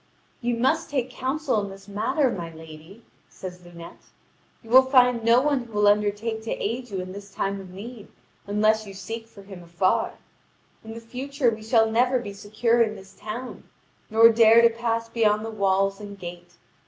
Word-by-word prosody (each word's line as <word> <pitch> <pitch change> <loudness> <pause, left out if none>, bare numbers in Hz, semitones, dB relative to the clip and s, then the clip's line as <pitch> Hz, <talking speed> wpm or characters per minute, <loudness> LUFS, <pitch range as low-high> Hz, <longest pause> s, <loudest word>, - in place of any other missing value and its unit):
"You 240 -1 -1
must 255 +3 +1
take 260 -3 -2
counsel 260 -2 -1
in 200 - -5
this 195 +1 -13
matter, 240 +7 0
my 170 -5 -5
lady," 160 +6 -13 0.2
says 180 -1 -9
Lunete; 170 -1 -13 0.5
"you 225 - -13
will 260 +1 +9
find 250 -3 +3
no 230 +2 +5
one 285 -1 +1
who 230 - -16
will 210 0 +3
undertake 210 +2 +1
to 225 - -8
aid 240 +4 -3
you 195 -2 -4
in 185 0 -7
this 200 +1 -10
time 195 0 -3
of 190 - -12
need 210 +4 -10 0.4
unless 215 +1 +1
you 195 - -10
seek 225 +4 -7
for 200 -3 -15
him 195 -2 -11
afar. 175 +2 0 0.7
In 225 0 -9
the - - -7
future 255 +2 -1
we 220 -1 -7
shall 225 0 +2
never 250 +3 +3
be 205 -5 -6
secure 230 +4 0
in 215 -2 +1
this 195 -1 -14
town, 235 +4 -8 0.4
nor 225 +1 +7
dare 230 0 +6
to 235 - +6
pass 230 0 -2
beyond 215 -2 +1
the 225 - -5
walls 195 -1 +1
and 205 -1 -9
gate. 175 -1 -10
220 Hz, 190 wpm, -24 LUFS, 195-235 Hz, 0.7 s, will